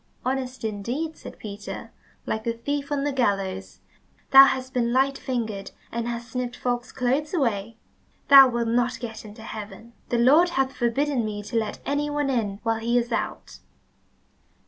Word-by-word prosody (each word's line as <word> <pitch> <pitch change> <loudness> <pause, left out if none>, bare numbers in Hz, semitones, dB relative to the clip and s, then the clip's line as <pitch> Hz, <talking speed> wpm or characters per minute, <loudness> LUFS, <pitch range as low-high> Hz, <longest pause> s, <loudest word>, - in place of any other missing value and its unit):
"Honest 260 -1 -2
indeed," 235 +10 -3
said - - -11
Peter, 205 -1 -8 0.3
"like 220 - -2
the 230 - -1
thief 280 +5 -3
on 285 -1 0
the 290 - 0
gallows! 195 -7 -1 0.5
Thou 270 0 +11
hast 260 -1 -2
been 235 -1 +1
light 270 +2 +2
fingered 225 -7 -3 0.2
and 235 0 -3
hast 235 0 -5
snipped 250 0 -3
folks' 245 0 -2
clothes 270 +6 -1
away. 230 - -1 0.5
Thou 275 -2 +10
wilt 235 -1 -1
not 245 +1 +1
get 225 -2 -7
into 215 +1 -11
heaven. 220 +1 -8 0.2
The 240 - +1
Lord 295 +9 +5
hath 270 0 +1
forbidden 255 +2 0
me 210 -1 -4
to 210 - -7
let 220 -2 -1
any 290 +1 0
one 290 -2 0
in 205 -5 -1
while 225 -1 0
he 235 +2 +1
is 240 0 0
out." - - -4
240 Hz, 170 wpm, -25 LUFS, 225-270 Hz, 0.5 s, Thou